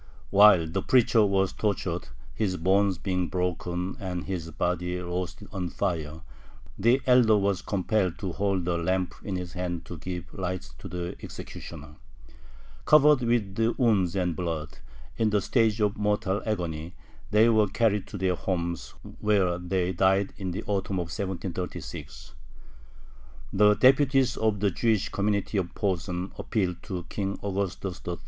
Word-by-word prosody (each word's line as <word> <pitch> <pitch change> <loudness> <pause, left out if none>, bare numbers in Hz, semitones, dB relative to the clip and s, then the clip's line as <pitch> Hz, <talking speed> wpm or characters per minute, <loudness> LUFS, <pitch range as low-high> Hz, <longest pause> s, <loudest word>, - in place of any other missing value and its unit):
While 100 -4 +7
the 90 +4 -2
preacher 120 -2 +4
was 95 -1 +2
tortured, 105 -4 -2 0.3
his 95 -4 -1
bones 95 +2 +2
being 90 -1 -1
broken 90 0 -2
and 90 -2 -4
his 90 -4 -4
body 90 +2 -1
roasted 90 +3 -4
on 95 -4 -3
fire, 80 -4 -3 0.5
the 120 +6 +3
elder 125 -4 +5
was 100 -2 +1
compelled 95 -2 0
to 95 -3 -4
hold 95 -1 -1
a 85 -1 +1
lamp 90 +1 0
in 100 - -3
his 90 -2 -5
hand 90 -2 -3
to 85 - -8
give 90 +1 -6
light 95 -1 -4
to - - -8
the 90 0 -5
executioner. 75 +1 -9 0.9
Covered 150 -2 +6
with 115 -4 0 0.2
wounds 100 -8 +2
and 90 -3 0
blood, 80 -3 -4 0.4
in 110 -1 +2
the 105 -1 +2
stage 110 +1 +2
of 105 -1 +1
mortal 105 -1 0
agony, 85 -4 -3 0.3
they 110 +2 +5
were 110 -2 +4
carried 105 0 +1
to 105 - -7
their 95 -1 +1
homes, 85 -2 -3 0.2
where 95 -5 +2
they 90 0 -1
died 95 +2 +2
in 95 -2 -4
the 90 - -4
autumn 100 -1 -2
of 85 -2 -3
1736. 95 -2 -5 1.2
The 105 +1 +5
deputies 135 +1 +4
of 110 -3 0
the 100 -2 +2
Jewish 110 +2 +1
community 100 0 0
of 90 -2 -4
Posen 90 -2 -2
appealed 90 -6 -1
to 90 -2 -5
King 100 +1 -3
Augustus 95 -2 -3
III. 85 -1 -2
95 Hz, 150 wpm, -27 LUFS, 90-105 Hz, 1.2 s, While